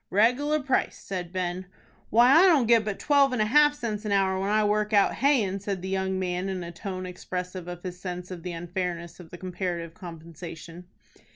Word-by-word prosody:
"Reg'lar 250 Hz, +9 st, +2 dB
price," 265 Hz, -2 st, 0 dB
said 180 Hz, -3 st, -6 dB
Ben. 180 Hz, 0 st, -3 dB, 0.4 s
"Why 240 Hz, +4 st, +6 dB
I 345 Hz, +5 st, +7 dB
don't 300 Hz, -9 st, +5 dB
get 230 Hz, -1 st, +5 dB
but 210 Hz, -2 st, -3 dB
twelve 280 Hz, -2 st, +3 dB
and 250 Hz, -, -1 dB
a -, -, 0 dB
half 295 Hz, +6 st, +5 dB
cents 220 Hz, -6 st, -4 dB
an 210 Hz, -, -3 dB
hour 190 Hz, -1 st, +2 dB
when 195 Hz, +1 st, -1 dB
I 215 Hz, +1 st, +3 dB
work 210 Hz, +1 st, +1 dB
out 200 Hz, -1 st, +4 dB
hayin'," 230 Hz, -8 st, +2 dB
said 195 Hz, -2 st, -4 dB
the 190 Hz, -, -4 dB
young 190 Hz, 0 st, -1 dB
man 185 Hz, 0 st, -2 dB
in 185 Hz, -2 st, -3 dB
a 170 Hz, -, -7 dB
tone 185 Hz, +1 st, -6 dB
expressive 180 Hz, 0 st, -6 dB
of 175 Hz, 0 st, -7 dB
his 180 Hz, -1 st, -6 dB
sense 180 Hz, 0 st, -6 dB
of 180 Hz, -2 st, -7 dB
the 180 Hz, +1 st, -5 dB
unfairness 175 Hz, 0 st, -4 dB
of 170 Hz, -2 st, -12 dB
the 175 Hz, -, -9 dB
comparative 175 Hz, -2 st, -4 dB
compensation. 165 Hz, 0 st, -10 dB
190 Hz, 205 wpm, -27 LUFS, 180-215 Hz, 0.4 s, I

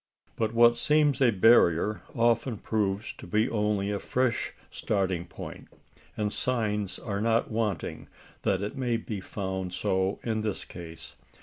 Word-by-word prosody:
But 110 Hz, 0 st, -1 dB
what 120 Hz, 0 st, +6 dB
seems 150 Hz, +1 st, +3 dB
a 130 Hz, -, +6 dB
barrier 105 Hz, -2 st, +4 dB
often 115 Hz, 0 st, +2 dB
proves 105 Hz, -1 st, -1 dB
to -, -, -9 dB
be 110 Hz, +2 st, +2 dB
only 105 Hz, -4 st, 0 dB
a 100 Hz, -, -1 dB
fresh 125 Hz, -2 st, 0 dB, 0.2 s
starting 95 Hz, -4 st, -1 dB
point; -, -, -9 dB, 0.5 s
and 105 Hz, -1 st, -1 dB
signs 105 Hz, -5 st, -1 dB
are 100 Hz, -3 st, -3 dB
not 115 Hz, +1 st, +1 dB
wanting 110 Hz, -6 st, -2 dB, 0.3 s
that 95 Hz, 0 st, +1 dB
it 105 Hz, -, -4 dB
may 125 Hz, -4 st, 0 dB
be 110 Hz, -3 st, -5 dB
found 95 Hz, -2 st, -4 dB
so 95 Hz, +1 st, 0 dB
in 110 Hz, -2 st, -1 dB
this 105 Hz, -3 st, -3 dB
case. 85 Hz, -2 st, -10 dB
105 Hz, 145 wpm, -28 LUFS, 95-115 Hz, 0.5 s, what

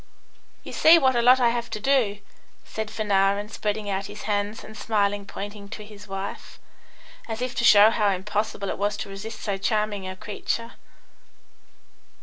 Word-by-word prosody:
"You -, -, -9 dB
see 325 Hz, +2 st, +7 dB
what 265 Hz, -5 st, +3 dB
a 240 Hz, -, +3 dB
lot 250 Hz, +2 st, +6 dB
I 240 Hz, -2 st, +4 dB
have 235 Hz, 0 st, -2 dB
to 215 Hz, -, -4 dB
do," 235 Hz, -4 st, +2 dB, 0.5 s
said 220 Hz, -1 st, -5 dB
Fanarin, 205 Hz, -1 st, +1 dB
spreading 210 Hz, 0 st, -3 dB
out 195 Hz, 0 st, -2 dB
his 210 Hz, +1 st, -9 dB
hands 205 Hz, +1 st, -2 dB
and 220 Hz, -, -11 dB
smilingly 205 Hz, -2 st, 0 dB
pointing 205 Hz, 0 st, -7 dB
to 210 Hz, 0 st, -8 dB
his 210 Hz, -1 st, -13 dB
wife, 195 Hz, +1 st, -6 dB, 0.7 s
as 225 Hz, -1 st, -4 dB
if 250 Hz, 0 st, -3 dB
to -, -, -2 dB
show 215 Hz, -1 st, +8 dB
how 210 Hz, -3 st, +2 dB
impossible 200 Hz, +1 st, -2 dB
it -, -, -4 dB
was 205 Hz, 0 st, 0 dB
to -, -, -6 dB
resist 210 Hz, +3 st, -7 dB
so 200 Hz, -2 st, -2 dB
charming 210 Hz, -2 st, -1 dB
a 185 Hz, -, -5 dB
creature. 230 Hz, +4 st, -4 dB
210 Hz, 170 wpm, -25 LUFS, 200-225 Hz, 0.7 s, show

